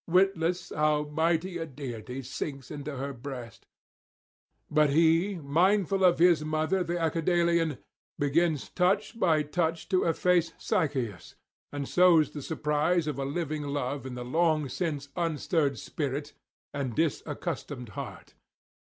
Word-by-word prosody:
witless 180 -1 +2
how 150 0 +2
mighty 165 +4 0
a 165 - -2
deity 130 -2 -6
sinks 135 +1 -5
into 145 -1 -5
her 140 +2 -4
breast; 125 -3 -8 1.0
but 150 -1 +3
he, 165 +6 +3
mindful 185 +5 +2
of 180 -2 +5
his 170 -3 +5
mother 155 +4 0
the 175 +1 -2
Acidalian, 165 -1 +1 0.4
begins 150 +1 +1
touch 195 +5 +1
by 160 -6 +3
touch 160 +2 -1
to 185 -2 +3
efface 170 0 +2
Sychaeus, 120 - -2 0.4
and 145 -1 -4
sows 175 -4 +5
the 145 - -6
surprise 155 +3 0
of 150 -3 -3
a 135 - -1
living 155 +1 -2
love 140 -1 -3
in 125 - -6
the 125 0 -5
long 155 +2 +2
since 145 -1 -3
unstirred 160 -4 0
spirit 145 +1 -4 0.4
and 130 -5 -3
disaccustomed 130 -5 -2
heart. 100 - -8
155 Hz, 130 wpm, -28 LUFS, 140-170 Hz, 1.0 s, of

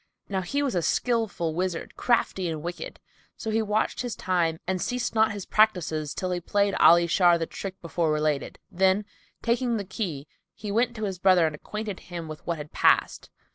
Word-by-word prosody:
Now 190 -2 -1
he 280 +11 -1
was 275 - -1
a 175 - +1
skilful 220 -6 0
wizard, 180 0 -3
crafty 195 -7 +1
and 155 -2 -4
wicked; 175 +1 -6 0.4
so 220 - -4
he 225 +1 +2
watched 215 0 0
his 245 -4 -4
time 170 -3 0
and 185 0 -1
ceased 245 -1 -2
not 220 -1 +3
his 205 -2 -6
practices 170 -8 +1
till 185 -1 -2
he 180 - -1
played 200 +3 +1
Ali 170 +1 +7
Shar 175 0 +4
the 165 - -2
trick 190 +3 -7
before 170 -1 0
related; 150 -2 -1
then, 190 +3 +2 0.4
taking 235 0 +1
the 200 - -4
key, 175 -7 -4 0.3
he 205 0 -6
went 235 +3 +1
to 220 - -5
his 190 -4 -3
brother 185 -3 +5
and 155 - -1
acquainted 210 +5 -6
him 170 -2 -7
with 155 -1 -8
what 170 -1 -1
had 150 0 -8
passed. - - +2
185 Hz, 195 wpm, -26 LUFS, 170-215 Hz, 0.4 s, Ali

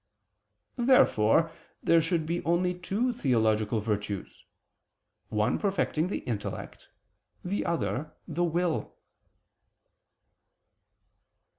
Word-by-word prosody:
Therefore 165 - +4 0.3
there 165 0 +5
should 165 0 0
be 170 +2 -2
only 180 +2 +1
two 200 +8 -1
theological 110 - +1
virtues, 105 -2 -4 0.8
one 105 0 +1
perfecting 185 -5 0
the 190 - -4
intellect, 110 -4 -5 0.6
the 195 +3 -1
other, 130 - -1 0.2
the 170 +2 -1
will. 175 0 -1
165 Hz, 85 wpm, -28 LUFS, 110-180 Hz, 0.8 s, there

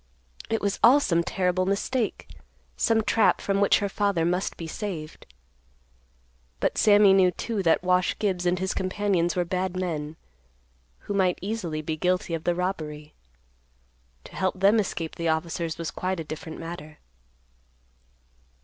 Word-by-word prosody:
It 225 - 0
was 200 0 -1
all 255 +5 +8
some 170 -11 +1
terrible 185 +1 0
mistake; 215 +4 -1 0.5
some 225 -1 +2
trap 220 0 +3
from 200 0 0
which 200 - +5
her 205 - -1
father 200 -4 0
must 180 +3 -1
be 165 - -6
saved. 160 -3 -6 1.3
But - - 0
Sammy 205 -2 +6
knew, 190 -1 +5
too, 215 +3 -3
that 170 -1 +2
Wash 180 0 +2
Gibbs 185 -4 -1
and 180 +1 +2
his 190 +1 -2
companions 185 -2 0
were 180 -1 0
bad 185 +1 -2
men, 160 -4 -3 0.9
who - - -5
might 185 -3 +2
easily 180 -7 -4
be 155 +1 -3
guilty 180 0 0
of 165 -1 -4
the 175 - +2
robbery. 155 -5 -4 1.1
To - - -13
help 185 0 -1
them 200 +4 +5
escape 170 -5 -3
the 170 -1 -1
officers 160 0 -2
was 165 -1 -4
quite 185 -1 -3
a - - -3
different 160 +1 -7
matter. 165 -2 -8
180 Hz, 150 wpm, -26 LUFS, 165-200 Hz, 1.3 s, all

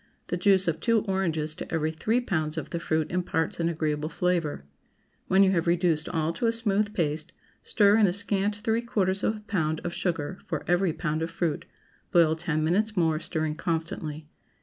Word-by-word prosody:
The - - 0
juice 190 +1 +3
of 165 -1 0
two 230 -2 +2
oranges 170 -7 -1
to - - -8
every 160 -1 0
three 220 +9 0
pounds 160 -9 -2
of 155 - -5
the 170 - -2
fruit 160 -2 -1
imparts 175 -3 -1
an 165 0 +1
agreeable 155 -2 -1
flavor. 170 - -1 0.6
When 190 +1 +5
you 190 - +4
have 170 -3 0
reduced 170 -2 +1
all 165 -1 0
to 230 +8 -1
a - - +4
smooth 210 -2 0
paste, 155 0 -1 0.3
stir 205 0 +4
in 215 -2 +5
a 175 - 0
scant 205 +1 0
three 220 +2 0
quarters 200 -5 0
of 220 - +1
a - - -12
pound 160 -7 -1
of 170 - -3
sugar 175 0 -2
for - - -3
every 175 0 +2
pound 155 -1 -2
of 165 - -1
fruit; 165 -2 -2 0.5
boil 165 -2 +5
ten 160 -2 -1
minutes 205 +6 +1
more, 160 -3 +2
stirring 155 -1 -2
constantly. 160 -2 -3
170 Hz, 195 wpm, -27 LUFS, 160-195 Hz, 0.6 s, When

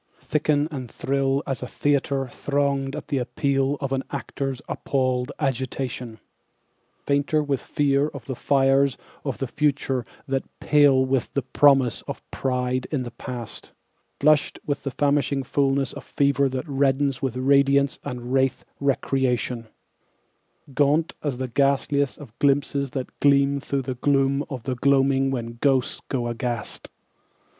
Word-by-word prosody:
Thicken 150 -1 +1
and 130 -5 -5
thrill 135 +2 0
as 135 -4 -3
a 125 - -4
theatre 140 -1 0
thronged 140 0 -1
at 150 - -7
appeal 135 +2 0
of 140 -2 -3
an 135 0 0
actor's 135 -2 -4
appalled 130 -1 -1
agitation, 130 -3 -3 0.9
Fainter 145 +2 +2
with 140 -3 -1
fear 140 0 +1
of 140 -6 -9
the 130 - -3
fires 135 0 +3 0.3
of 135 -3 -3
the 135 - -2
future 140 -2 0 0.2
than 135 -1 0 0.2
pale 145 -3 +4
with 130 -2 0
the 140 - +1
promise 135 -2 +4
of - - -6
pride 125 -1 -1
in 140 -5 0
the 120 - -7
past; 120 -1 -8 0.5
Flushed 150 0 +3
with 145 -1 -2
the 140 - -3
famishing 140 0 +1
fullness 135 0 +1
of - - -8
fever 140 -1 +2
that 130 +3 -4
reddens 135 -1 +1
with 130 -3 -2
radiance 140 +1 +3
and 125 0 -5
rathe* 135 -1 +2 0.2
recreation, 130 -4 0 1.0
[speedy] 140 - -18
Gaunt 150 +3 +2
as 140 -5 -2
the 130 0 -3
ghastliest 140 +2 +1
of 135 -7 -12
glimpses 140 0 +1
that 130 - -6
gleam 140 0 +4
through 140 0 -2
the 130 0 -3
gloom 140 +2 +2
of 130 -5 -6
the 130 - -2
gloaming 135 +1 +3
when 115 -3 -4
ghosts 135 -3 +1
go 125 -3 -1
aghast? 120 -1 -4
135 Hz, 145 wpm, -24 LUFS, 130-140 Hz, 1.0 s, pale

